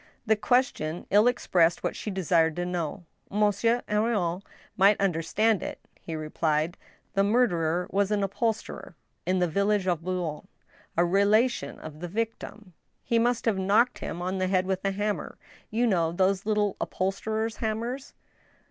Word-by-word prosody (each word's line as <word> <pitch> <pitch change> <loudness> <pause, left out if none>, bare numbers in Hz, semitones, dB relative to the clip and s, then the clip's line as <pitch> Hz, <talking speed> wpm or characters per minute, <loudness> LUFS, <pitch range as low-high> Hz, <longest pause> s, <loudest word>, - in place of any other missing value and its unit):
The 220 -1 +4
question 210 - 0
ilj 210 +4 +6
expressed 175 -8 +2
what - - -1
she - - -5
desired 170 -4 +2
to 175 - -2
know. 175 0 -3 0.2
Monsieur 210 +3 +2
Henrion 210 -5 0 0.3
might 200 +1 +5
misunderstand 195 +4 +1
it. - - -5 0.2
He 165 - -6
replied: 155 +1 -1 0.2
" - - -39
The 195 - +3
murderer 180 -7 +2
was 200 0 +1
an 210 -1 +1
upholsterer 210 -2 -3 0.3
in 185 +1 +2
the 180 -1 +2
village 200 +3 +1
of 175 -4 0
Boulogne, 175 -4 -3 0.5
a 170 - +4
relation 205 +7 +2
of 155 -1 -10
the 175 - -5
victim. 215 -1 -5 0.3
He 235 - +1
must 240 0 +1
have 215 -5 +1
knocked 205 +6 +3
him 175 +2 -5
on 185 +1 -2
the 185 - +1
head 185 0 +1
with 190 0 -2
a 195 - +1
hammer— 205 +1 -3 0.3
you 230 +3 +1
know 170 -7 +2
those 190 +3 +1
little 210 -2 +1
upholsterer's 220 +3 -2
hammers 235 +5 -3
195 Hz, 155 wpm, -27 LUFS, 175-215 Hz, 0.5 s, ilj